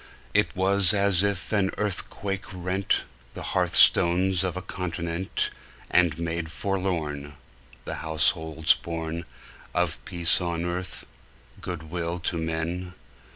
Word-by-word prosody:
It -, -, +2 dB
was 95 Hz, +1 st, +4 dB
as 100 Hz, -3 st, +3 dB
if 100 Hz, 0 st, -1 dB
an 100 Hz, -3 st, +2 dB
earthquake 100 Hz, -1 st, -2 dB
rent 90 Hz, +1 st, -1 dB, 0.3 s
The -, -, -6 dB
hearth -, -, +1 dB
stones 90 Hz, +1 st, +6 dB
of 90 Hz, -1 st, -1 dB
a -, -, -3 dB
continent, 85 Hz, -1 st, -2 dB, 0.4 s
And 85 Hz, -3 st, +3 dB
made 85 Hz, 0 st, -3 dB
forlorn 85 Hz, -8 st, -3 dB, 0.5 s
The -, -, -4 dB
households 80 Hz, 0 st, +2 dB
born 85 Hz, -1 st, -5 dB, 0.5 s
Of -, -, 0 dB
peace 85 Hz, 0 st, +3 dB
on 85 Hz, -1 st, -2 dB
earth, 90 Hz, +1 st, -4 dB, 0.6 s
good 80 Hz, -4 st, -6 dB
will 85 Hz, 0 st, -2 dB
to 85 Hz, 0 st, -2 dB
men! 85 Hz, +3 st, -3 dB
90 Hz, 120 wpm, -26 LUFS, 80-95 Hz, 0.6 s, stones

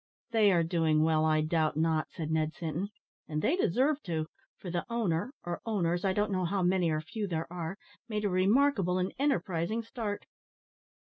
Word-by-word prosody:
"They 215 Hz, -3 st, +5 dB
are 170 Hz, -2 st, +3 dB
doing 160 Hz, -2 st, +2 dB
well, 160 Hz, -1 st, +3 dB
I 155 Hz, -1 st, +3 dB
doubt 155 Hz, -1 st, +1 dB
not," 160 Hz, -1 st, +1 dB
said 160 Hz, -1 st, -5 dB
Ned 155 Hz, 0 st, 0 dB
Sinton; 170 Hz, +4 st, -3 dB, 0.4 s
"and 155 Hz, 0 st, -2 dB
they 310 Hz, -, +3 dB
deserve 285 Hz, -, +2 dB
to, 160 Hz, -3 st, -1 dB, 0.3 s
for 180 Hz, -, -7 dB
the 175 Hz, 0 st, -1 dB
owner 215 Hz, -2 st, 0 dB
or 175 Hz, 0 st, -4 dB
owners, 175 Hz, -6 st, 0 dB
I 195 Hz, -, +2 dB
don't 205 Hz, +2 st, 0 dB
know 185 Hz, -2 st, 0 dB
how 190 Hz, +2 st, 0 dB
many 180 Hz, -1 st, +3 dB
or 155 Hz, -1 st, 0 dB
few 205 Hz, +6 st, -4 dB
there 165 Hz, -3 st, -2 dB
are 175 Hz, +2 st, -4 dB, 0.3 s
made 210 Hz, -1 st, -1 dB
a -, -, +2 dB
remarkable 195 Hz, 0 st, +3 dB
and 185 Hz, 0 st, -1 dB
enterprising 215 Hz, -, 0 dB
start." 220 Hz, -3 st, -4 dB
180 Hz, 185 wpm, -30 LUFS, 160-210 Hz, 0.4 s, They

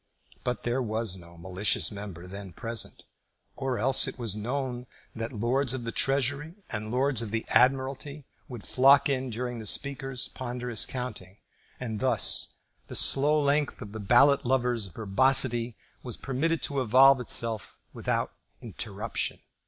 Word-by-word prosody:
But 125 Hz, 0 st, -3 dB
there 120 Hz, +2 st, -1 dB
was 110 Hz, -4 st, -3 dB
no 85 Hz, -2 st, -14 dB
malicious 95 Hz, +6 st, -1 dB
member 100 Hz, -4 st, -8 dB
then 95 Hz, 0 st, -9 dB
present, 115 Hz, +4 st, -4 dB, 0.5 s
or 135 Hz, -2 st, -2 dB
else 130 Hz, +5 st, +4 dB
it -, -, -6 dB
was 115 Hz, -5 st, -1 dB
known 125 Hz, +2 st, -4 dB, 0.3 s
that 115 Hz, +1 st, -4 dB
Lords 130 Hz, +3 st, 0 dB
of 125 Hz, -, -5 dB
the 115 Hz, -, -3 dB
Treasury 140 Hz, +6 st, -1 dB, 0.2 s
and 110 Hz, -1 st, -4 dB
Lords 130 Hz, 0 st, +1 dB
of 115 Hz, -, -4 dB
the 115 Hz, +1 st, -3 dB
Admiralty 135 Hz, +3 st, +1 dB, 0.2 s
would 120 Hz, -5 st, -9 dB
flock 135 Hz, +2 st, +4 dB
in 130 Hz, -1 st, -1 dB
during 120 Hz, +1 st, -4 dB
the 110 Hz, -, -4 dB
Speaker's 135 Hz, +1 st, +1 dB
ponderous 125 Hz, -2 st, -1 dB
counting, 105 Hz, -7 st, -6 dB, 0.4 s
and 110 Hz, -4 st, -4 dB
thus 130 Hz, -1 st, +2 dB, 0.3 s
the -, -, -7 dB
slow 150 Hz, +3 st, +4 dB
length 145 Hz, 0 st, 0 dB
of 105 Hz, -4 st, -9 dB
the 110 Hz, -, -7 dB
ballot 125 Hz, +7 st, +4 dB
lover's 125 Hz, -4 st, 0 dB
verbosity 120 Hz, +4 st, +3 dB, 0.2 s
was 125 Hz, -3 st, -4 dB
permitted 155 Hz, +5 st, -1 dB
to 140 Hz, -2 st, -1 dB
evolve 130 Hz, +3 st, +6 dB
itself 115 Hz, -4 st, -4 dB, 0.2 s
without -, -, -2 dB, 0.3 s
interruption. 110 Hz, +1 st, -4 dB
125 Hz, 145 wpm, -27 LUFS, 110-135 Hz, 0.5 s, evolve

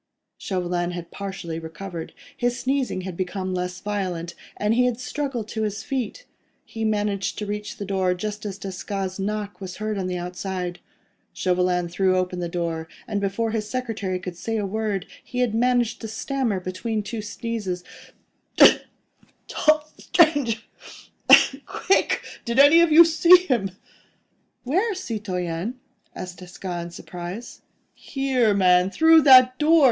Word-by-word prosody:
Chauvelin 175 Hz, -2 st, -2 dB
had 175 Hz, -1 st, -7 dB
partially 190 Hz, -5 st, -5 dB
recovered; 165 Hz, +1 st, -8 dB, 0.2 s
his 245 Hz, -2 st, -1 dB
sneezing 265 Hz, -7 st, -1 dB
had 185 Hz, -1 st, -6 dB
become 185 Hz, +1 st, -3 dB
less 180 Hz, 0 st, -3 dB
violent, 185 Hz, -5 st, -3 dB, 0.2 s
and 210 Hz, +1 st, +1 dB
he 250 Hz, +2 st, +3 dB
had 245 Hz, -1 st, 0 dB
struggled 255 Hz, -4 st, -3 dB
to 220 Hz, -, -3 dB
his 215 Hz, 0 st, -2 dB
feet. 270 Hz, -, -4 dB, 0.4 s
He 225 Hz, -, -6 dB
managed 205 Hz, -2 st, -1 dB
to 210 Hz, -, -3 dB
reach 210 Hz, 0 st, -5 dB
the 200 Hz, -, -5 dB
door 190 Hz, -2 st, 0 dB
just 210 Hz, +3 st, -5 dB
as 200 Hz, -2 st, -5 dB
Desgas' 195 Hz, 0 st, -5 dB
knock 205 Hz, 0 st, -3 dB
was 185 Hz, -1 st, -6 dB
heard 215 Hz, -1 st, -3 dB
on 185 Hz, -, -2 dB
the 180 Hz, -1 st, -2 dB
outside. 180 Hz, 0 st, -4 dB, 0.5 s
Chauvelin 180 Hz, -1 st, +1 dB
threw 185 Hz, +2 st, +1 dB
open 180 Hz, 0 st, -1 dB
the 175 Hz, -1 st, -3 dB
door, 165 Hz, -2 st, -3 dB, 0.2 s
and 205 Hz, -3 st, -2 dB
before 200 Hz, +3 st, -1 dB
his 215 Hz, -1 st, -3 dB
secretary 225 Hz, -7 st, -3 dB
could 180 Hz, -1 st, -7 dB
say 225 Hz, +6 st, -3 dB
a 210 Hz, -, -1 dB
word, 210 Hz, -1 st, -2 dB, 0.2 s
he 250 Hz, -, -8 dB
had 250 Hz, -3 st, +1 dB
managed 245 Hz, 0 st, +1 dB
to 225 Hz, -, -5 dB
stammer 230 Hz, -1 st, -2 dB
between 195 Hz, +4 st, -3 dB
two 220 Hz, +2 st, -5 dB
sneezes— 210 Hz, -4 st, -4 dB, 0.7 s
"The -, -, +8 dB, 0.7 s
tall 305 Hz, 0 st, +2 dB
stranger—quick!—did 270 Hz, -, +1 dB
any 290 Hz, +5 st, +8 dB
of 340 Hz, -2 st, +3 dB
you 335 Hz, +2 st, +9 dB
see 335 Hz, +2 st, +7 dB
him?" 235 Hz, -, 0 dB, 0.9 s
"Where, 380 Hz, -, 0 dB
citoyen?" 205 Hz, -, -4 dB, 0.4 s
asked 180 Hz, -1 st, -7 dB
Desgas, 175 Hz, -1 st, -6 dB
in -, -, -7 dB
surprise. 180 Hz, +6 st, -8 dB, 0.3 s
"Here, 260 Hz, -6 st, 0 dB
man! 180 Hz, -1 st, +4 dB
through 320 Hz, +8 st, +6 dB
that 255 Hz, -2 st, +7 dB
door! 320 Hz, +2 st, +5 dB
205 Hz, 145 wpm, -24 LUFS, 180-245 Hz, 0.9 s, you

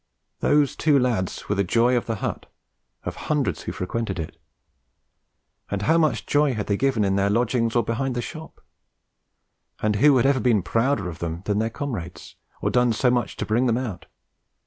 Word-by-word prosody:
Those 145 Hz, -1 st, +2 dB
two 150 Hz, -3 st, +3 dB
lads 120 Hz, -8 st, -1 dB
were -, -, +1 dB
the 100 Hz, 0 st, +1 dB
joy 120 Hz, +6 st, +3 dB
of 120 Hz, -, -1 dB
the 115 Hz, -, -1 dB
hut, -, -, -4 dB, 0.6 s
of -, -, -4 dB
hundreds -, -, -1 dB
who -, -, -5 dB
frequented 95 Hz, +1 st, -3 dB
it. 80 Hz, -2 st, -5 dB, 1.3 s
And 100 Hz, 0 st, -2 dB
how 160 Hz, +6 st, +3 dB
much 155 Hz, -7 st, +1 dB
joy 145 Hz, -3 st, +2 dB
had 105 Hz, -, -2 dB
they 100 Hz, -, 0 dB
given 130 Hz, -1 st, +1 dB
in 95 Hz, 0 st, +1 dB
their 100 Hz, 0 st, +2 dB
lodgings 115 Hz, +1 st, +1 dB
or 120 Hz, -, +3 dB
behind 120 Hz, +4 st, -2 dB
the -, -, -1 dB
shop? 160 Hz, -1 st, -9 dB, 1.2 s
Who 110 Hz, +7 st, +4 dB
had 125 Hz, -, +3 dB
ever 135 Hz, -1 st, +3 dB
been 115 Hz, -7 st, +2 dB
prouder 115 Hz, 0 st, 0 dB
of 85 Hz, -1 st, -7 dB
them 85 Hz, +1 st, -4 dB
than 105 Hz, 0 st, 0 dB
their 110 Hz, +1 st, 0 dB
comrades, 110 Hz, -, -6 dB, 0.3 s
or -, -, +1 dB
done 125 Hz, -1 st, +3 dB
so 125 Hz, +3 st, +2 dB
much 120 Hz, -1 st, -1 dB
to -, -, -2 dB
'bring 120 Hz, +4 st, +1 dB
them 115 Hz, -1 st, +2 dB
out'? 115 Hz, -8 st, -5 dB
115 Hz, 190 wpm, -24 LUFS, 100-130 Hz, 1.3 s, Who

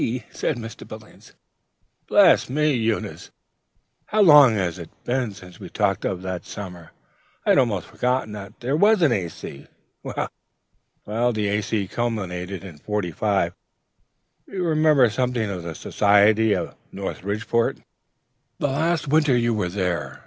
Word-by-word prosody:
said 150 Hz, -, -2 dB
Mr. 115 Hz, -1 st, -9 dB
Billings. -, -, -13 dB, 0.7 s
"Bless -, -, +5 dB
me, 150 Hz, +2 st, +2 dB
Eunice! 115 Hz, -3 st, -2 dB, 0.8 s
how 215 Hz, -, +2 dB
long 145 Hz, -, +8 dB
it -, -, +1 dB, 0.2 s
is 85 Hz, -, -8 dB, 0.5 s
since 90 Hz, -2 st, -13 dB
we -, -, -8 dB
have -, -, -18 dB
talked -, -, 0 dB
of 95 Hz, -1 st, -2 dB
that 95 Hz, -1 st, -4 dB
summer! 90 Hz, -5 st, -9 dB, 0.6 s
I -, -, +4 dB
had -, -, +5 dB
almost 110 Hz, -8 st, 0 dB
forgotten 125 Hz, -3 st, -1 dB
that 100 Hz, -2 st, -9 dB
there 125 Hz, +2 st, -3 dB
ever 145 Hz, -, +2 dB
was 210 Hz, -1 st, +5 dB
an 150 Hz, -, +4 dB
A.C.... 85 Hz, -8 st, -4 dB, 0.3 s
Well, -, -, -3 dB, 1.1 s
the 105 Hz, -2 st, -1 dB
A.C. 105 Hz, 0 st, -1 dB
culminated 95 Hz, -6 st, -3 dB
in 85 Hz, -6 st, -11 dB
'45. 100 Hz, +1 st, -1 dB, 0.9 s
You 190 Hz, -2 st, -4 dB
remember 155 Hz, -5 st, +4 dB
something 125 Hz, -2 st, -1 dB
of 90 Hz, -2 st, -5 dB
the 85 Hz, -1 st, -6 dB
society 105 Hz, +1 st, +3 dB
of -, -, -4 dB, 0.2 s
Norridgeport, 105 Hz, +4 st, -2 dB, 0.7 s
the 145 Hz, -, 0 dB
last 160 Hz, +3 st, 0 dB
winter 150 Hz, -3 st, +3 dB
you 120 Hz, -1 st, +1 dB
were 105 Hz, -5 st, -1 dB
there? 90 Hz, -2 st, -3 dB
110 Hz, 140 wpm, -23 LUFS, 95-130 Hz, 1.1 s, long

